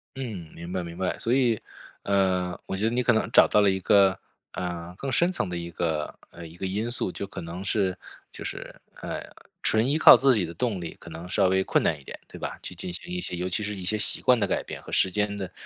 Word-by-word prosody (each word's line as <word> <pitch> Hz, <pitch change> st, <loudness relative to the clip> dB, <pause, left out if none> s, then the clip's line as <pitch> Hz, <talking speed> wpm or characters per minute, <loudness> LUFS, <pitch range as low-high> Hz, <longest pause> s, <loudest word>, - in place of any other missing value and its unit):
嗯， 105 Hz, -12 st, -6 dB
明 85 Hz, +1 st, -8 dB
白 90 Hz, -1 st, -2 dB
明 85 Hz, 0 st, -8 dB
白， 95 Hz, +1 st, -2 dB
所 115 Hz, -, 0 dB
以 120 Hz, -5 st, +3 dB, 0.4 s
呃 95 Hz, -3 st, +1 dB
我 95 Hz, -, -3 dB
觉 100 Hz, -, -3 dB
得 115 Hz, -, +2 dB
你 125 Hz, +1 st, +1 dB
可 120 Hz, -, +3 dB
能 110 Hz, -, +1 dB
找 -, -, +7 dB
到 105 Hz, -, +4 dB
了 100 Hz, -, +5 dB
一 95 Hz, -, -1 dB
个 95 Hz, 0 st, +4 dB, 0.3 s
呃 90 Hz, -1 st, -5 dB
更 135 Hz, +7 st, -4 dB
深 175 Hz, +7 st, +3 dB
层 100 Hz, -, -2 dB
的 90 Hz, -, -3 dB
一 85 Hz, 0 st, -6 dB
个 80 Hz, -3 st, -2 dB, 0.2 s
呃 85 Hz, -, -10 dB
一 80 Hz, -, -14 dB
个 95 Hz, +2 st, -4 dB
因 105 Hz, +5 st, -2 dB
素 120 Hz, -6 st, -1 dB
就 100 Hz, -, -5 dB
可 100 Hz, -, -8 dB
能 85 Hz, +3 st, -6 dB
是 95 Hz, -2 st, 0 dB, 0.3 s
就 -, -, -8 dB
是， -, -, -6 dB, 0.3 s
呃， -, -, -4 dB, 0.4 s
纯 110 Hz, +2 st, +3 dB
依 145 Hz, -, +2 dB
靠 -, -, +10 dB
自 135 Hz, -2 st, +4 dB
己 100 Hz, -5 st, +1 dB
的 85 Hz, -, -7 dB
动 105 Hz, +2 st, -1 dB
力 85 Hz, -2 st, -6 dB
可 -, -, -11 dB
能 85 Hz, +2 st, -8 dB
稍 90 Hz, -, +2 dB
微 95 Hz, +1 st, +2 dB
困 -, -, +1 dB
难 -, -, +1 dB
一 -, -, -17 dB
点， -, -, -9 dB
对 -, -, -11 dB
吧？ -, -, -5 dB
去 -, -, -8 dB
进 90 Hz, -, -6 dB
行 175 Hz, -, -7 dB
一 180 Hz, -, -2 dB
些， 135 Hz, -, -2 dB
尤 90 Hz, +1 st, -2 dB
其 100 Hz, +4 st, -1 dB
是 105 Hz, 0 st, -3 dB
一 95 Hz, -, -7 dB
些 110 Hz, +4 st, 0 dB
习 105 Hz, -, +1 dB
惯 125 Hz, -, +5 dB
的 105 Hz, -, +1 dB
改 -, -, 0 dB
变 -, -, -7 dB
和 -, -, -11 dB
时 95 Hz, -, +4 dB
间 105 Hz, +2 st, -1 dB
的 95 Hz, -3 st, -5 dB
95 Hz, 290 characters per minute, -26 LUFS, 90-110 Hz, 0.4 s, 靠